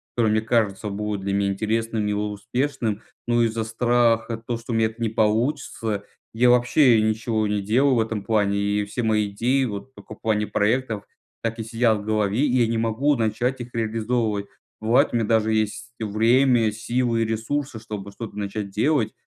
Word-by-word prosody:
который 115 -3 +2
мне 110 0 +2
кажется 110 -2 0
будет 105 0 -3
для 100 0 -2
меня 100 0 +1
интересным 110 +1 -1
и 105 - 0
успешным, 110 +2 -2 0.2
но 120 0 +3
из-за 115 0 0
страха 115 0 +1
то, 120 0 -3
что 115 +1 -8
у - - 0
меня 110 0 +3
это 110 +2 -11
не 115 -1 0
получится, 110 -1 0 0.3
я 120 +2 +4
вообще 120 0 +5
ничего 110 0 0
не 105 0 -1
делал 125 +7 +3
в - - +2
этом 110 -2 -2
плане, 100 -1 +1
и 100 0 0
все 110 +4 -4
мои 105 -2 +1
идеи, 125 +7 +1
вот 110 +3 -6
только 110 - -11
в - - -32
плане 105 -1 0
проектов, 110 -1 0 0.4
так 115 0 -2
и - - -2
сидят 115 -1 +1
в - - -7
голове, 105 0 0
и 130 -3 +2
я 120 - +4
не 115 0 -1
могу 115 +6 +1
начать 120 +3 -1
их 120 - -7
реализовывать. 110 -2 -1 0.3
Бывает, 115 +3 +3
у - - 0
меня 115 -2 +1
даже 110 -1 +2
есть 110 +3 -2
время, 115 +2 +3
силы 115 +1 -1
и - - +2
ресурсы, 115 +4 -2
чтобы 105 -2 -7
что-то 110 +1 -8
начать 100 0 -4
делать, 115 +2 +1
110 Hz, 190 wpm, -23 LUFS, 105-120 Hz, 0.4 s, вообще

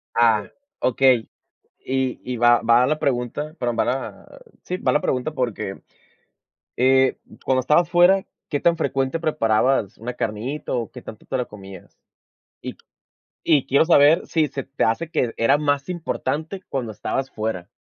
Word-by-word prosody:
Ah, 110 -3 +3 0.3
okey. 125 -2 +2 0.6
Y 130 -1 -1
y 125 -1 -4
va 120 0 +4
va 120 +2 +4
la 155 +2 0
pregunta, 140 +3 -2
perdón, 120 -1 -2
va - - +3
la 135 - -5 0.2
sí, 180 - -4
va - - 0
la 150 - +2
pregunta 130 +4 -1
porque, 115 -7 -4 0.9
eh, 130 +1 +3 0.3
cuando 130 -1 +2
estabas 165 +6 +2
fuera, 180 +2 +4 0.2
¿qué 145 - -1
tan 170 -1 +2
frecuente 135 +1 -1
preparabas 115 - +1
una 120 +2 -5
carnita, 115 +9 -4
o, 120 -3 -2
qué 125 - -10
tanto 110 - -11
te - - -2
la 125 - -1
comías? 95 -2 -13 0.6
Y - - -6
q - - -29 0.7
y 145 -5 +4
quiero 140 +4 +3
saber 155 -1 +5
si 155 -2 +1
se 135 - -5
te 135 +1 -2
hace 155 +9 0
que 120 -7 -1
era 135 +5 +3
más 145 -1 0
importante 175 +1 -4
cuando 125 -5 -3
estabas 135 +5 -3
fuera. 105 -5 -4
130 Hz, 160 wpm, -22 LUFS, 120-150 Hz, 0.9 s, saber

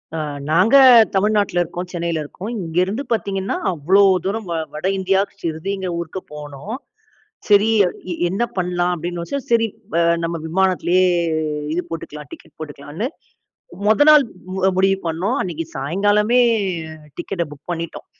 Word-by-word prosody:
அ - - -2 0.3
நாங்க 185 - +4 0.4
தமிழ்நாட்டில 200 -2 +2
இருக்கோம், 175 +2 -6
சென்னையில 170 -2 -2
இருக்கோம். 185 +8 -8
இங்கேருந்து 185 - -1
பார்த்தீங்கன்னா 195 -3 -2 0.2
அவ்வளோ 180 +5 +3 0.2
தூரம் 210 +2 -2
வ 170 - -2 0.2
வட 155 +5 -3
இந்தியாக்கு 195 +1 +1
ஷ்ரிடிங்கிற 185 +4 -3
ஊருக்கு 170 +2 -5
போனோம். 150 - -7 0.7
சரி 205 +1 +5 0.2
எ 180 0 -6
என்ன 195 +6 -2
பண்ணலாம் 180 0 0
அப்படின்னு 175 +1 -5
யோசிச்சேன், 275 +10 -4
சரி 230 -1 +4 0.3
வ - - -1 0.3
நம்ம 170 0 -2
விமானத்திலேயே 185 +1 +2 0.7
இது 175 +2 -1
போட்டுக்கலாம் 150 -3 -7
டிக்கெட் - - -13
போட்டுக்கலாம்ன்னு, 150 - -5 0.8
மொத 220 +8 +4
நாள் 300 -2 +7 0.5
முடிவு 195 +1 +3
பண்ணோம், 180 +10 -1
அன்னைக்கு 165 -3 -4
சாயங்காலமே 205 - +2 0.8
டிக்கெட்ட 175 -4 -3
புக் 145 +2 -15
பண்ணிட்டோம். 170 -1 -6
180 Hz, 130 wpm, -20 LUFS, 165-200 Hz, 0.8 s, நாள்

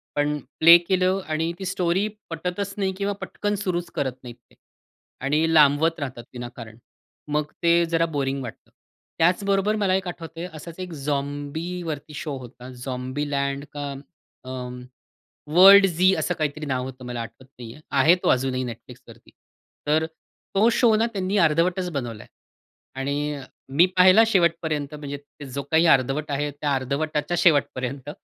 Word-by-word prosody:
पण 145 0 +1 0.2
प्ले 165 +2 +9
केलं 185 +2 +1
आणि 160 +1 -1
ती 190 - -5
स्टोरी 180 +2 0 0.2
पटतच 180 +4 -4
नाही 195 -2 0
किंवा 200 0 -1
पटकन 205 0 -2
सुरूच 180 -4 -2
करत 130 -3 -1
नाहीत 120 -1 -9 0.2
ते. - - -23 0.7
आणि 155 +4 +1
लांबवत 155 +2 +4
राहतात 130 -4 -5
विनाकारण. 120 -2 -9 0.5
मग 150 0 -1
ते 170 0 +4
जरा 165 0 +1
बोरिंग 135 -1 -1
वाटतं. 115 - -10 0.5
त्याचबरोबर 195 +4 +2
मला 200 -3 +1
एक 190 -1 -2
आठवतंय 165 0 -7
असाच 165 +3 -10
एक 185 -1 -6
झॉम्बीवरती 145 +3 -4
शो 145 -2 -5
होता. 125 0 -11
झॉम्बी 130 +3 -4
लँड 140 0 -1
का 145 -1 -4 0.5
अ, 130 - -10 1.1
वर्ल्ड 195 +2 +9
झी 185 +2 +3
असं 180 - -1
काहीतरी 155 0 -2
नाव 130 -3 -1
होतं, 130 -1 -9
मला 120 -1 -4
आठवत 115 +3 -10
नाही 115 -1 -8
आहे. 150 - -16
आहे 145 +5 +5
तो - - +2
अजूनही 130 0 +1
Netflixवरती. 120 -3 -12 0.6
तर 155 +2 +3
अ, - - -2 0.5
तो 215 +4 +5
शो 235 -1 +4
ना 220 +2 +2
त्यांनी 195 +1 -1
अर्धवटच 175 +4 0
बनवला 120 -8 -5
आहे - - -23 0.7
आणि 145 +2 -1
अ, 140 - -8 0.3
मी 155 +7 +5
पाहिला 185 +5 +7
शेवटपर्यंत 160 -7 +1
म्हणजे 145 -1 -6 0.4
जो 140 - -2
काही 160 +2 +4
अर्धवट 140 +2 +2
आहे 145 +1 -1
त्या 145 0 -2
अर्धवटाच्या 150 +5 -2
शेवटपर्यंत, 140 -3 +1
150 Hz, 155 wpm, -24 LUFS, 140-180 Hz, 1.1 s, प्ले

